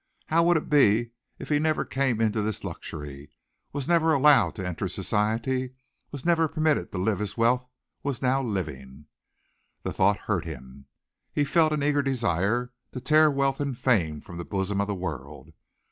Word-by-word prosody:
How 165 +2 +4
would 170 0 +4
it 155 - -4
be 120 -5 +4 0.3
if - - -9
he 150 -1 +3
never 155 0 +1
came 130 -4 0
into 110 -1 +1
this 105 0 -3
luxury, 70 -1 -7 0.4
was 140 -2 -4
never 165 -2 +3
allowed 145 0 +5
to 95 -3 -4
enter 90 -3 -3
society, 120 +5 -1 0.3
was 145 0 -8
never 165 -2 +3
permitted 155 -1 0
to - - -5
live 100 +2 0
as 105 +1 -4
wealth 125 +2 +2 0.3
was 140 -4 -3
now 130 +1 +1
living! 75 - -5 0.8
The - - -3
thought 100 +2 +3
hurt 95 -6 -1
him. 70 -3 -10 0.4
He 145 - +1
felt 155 +2 +3
an 150 -2 -1
eager 145 0 +2
desire 120 -2 0 0.2
to 125 - -4
tear 155 +4 +5
wealth 135 -1 0
and 140 -4 -2
fame 90 - +1
from 85 -1 -10
the - - -3
bosom 100 +1 -1
of 100 - -1
the 105 - -2
world. 75 -6 -7
120 Hz, 175 wpm, -26 LUFS, 95-145 Hz, 0.8 s, allowed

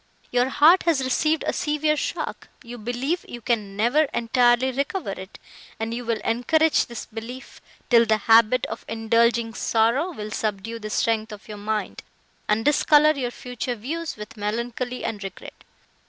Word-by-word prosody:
Your 245 +1 +2
heart 310 +7 +6
has 300 -6 +3
received 305 +4 +1
a - - 0
severe 305 0 0
shock; - - -4 0.2
you 240 0 -9
believe 245 +10 -2
you 240 - -7
can 210 -4 -2
never 245 +9 +3
entirely 240 0 +2
recover 280 - -2
it, 190 0 -9 0.4
and 225 +1 -3
you 245 +1 -4
will 230 -1 -1
encourage 310 +7 +2
this 235 -1 -7
belief, 230 +4 -9 0.3
till 235 -1 +6
the 220 0 +3
habit 225 +3 +4
of - - -7
indulging 230 +1 +1
sorrow 230 +11 +1
will 215 -8 -7
subdue 215 +2 -3
the 215 -1 -6
strength 220 0 0
of 210 0 -11
your 210 -1 -8
mind, 215 +1 -3 0.5
and 215 +2 +1
discolour 300 +1 +5
your 260 -4 -2
future 245 0 -5
views 310 +8 -5
with 210 +1 -9
melancholy 235 +4 -3
and 210 -3 -4
regret. 195 -2 -9
235 Hz, 160 wpm, -24 LUFS, 220-265 Hz, 0.5 s, heart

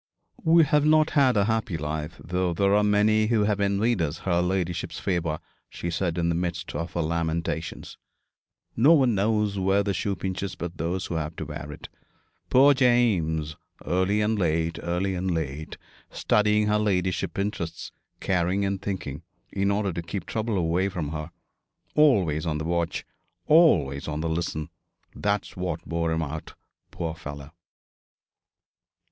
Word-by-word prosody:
'We 165 +1 +6
have 150 0 +3
not 155 0 +4
had 130 -5 +4
a 100 - +3
happy 110 -5 -1
life, 75 +1 -4
though 90 0 -1
there 100 +2 +2
are 105 0 +4
many 105 +1 +3
who 110 -2 +2
have 105 -1 +1
envied 100 +1 +1
us 75 -1 -1
her 85 -2 +2
ladyship's 90 -1 -2
favour,' 85 -4 -1 0.3
she 85 - -5
said 85 0 -1
in 85 -1 +1
the 85 - +1
midst 85 0 -3
of 85 +3 -4
her 85 - 0
lamentations. 85 0 -3 0.8
'No 140 +9 +6
one 130 -7 +4
knows 105 0 +1
where 95 +2 +2
the 100 -1 -1
shoe 95 +3 -1
pinches 95 +2 -4
but 85 0 -6
those 90 +4 -2
who - - -5
have 80 0 -4
to 80 - -5
wear 75 0 -7
it. 75 - -9 0.6
Poor 140 +3 +6
James! 100 - +2 0.3
Early 95 +4 +1
and 105 0 +1
late, 85 -1 0
early 90 +3 -1
and 95 +1 -2
late, 80 -2 -3 0.3
studying 105 0 +2
her 105 0 +2
ladyship's 95 -3 0
interests, 85 -5 -3 0.3
caring 95 +2 0
and 100 -1 -2
thinking, 85 -7 -4 0.3
in 100 0 0
order 100 -2 0
to 85 - -3
keep 85 +2 -5
trouble 110 -2 -2
away 90 +2 +1
from 85 -7 -4
her. 75 +1 -5 0.6
Always 95 - +3
on 75 -1 0
the 75 - -4
watch, 85 0 -1 0.4
always 85 - +4
on 75 0 -3
the 80 - -1
listen. 80 -2 -2 0.5
That's 105 -1 -1
what 90 -2 -4
wore 85 0 -1
him 80 0 0
out, 80 +1 -6 0.3
poor 85 -2 -4
fellow!' 75 -2 -9
90 Hz, 160 wpm, -26 LUFS, 80-105 Hz, 0.8 s, We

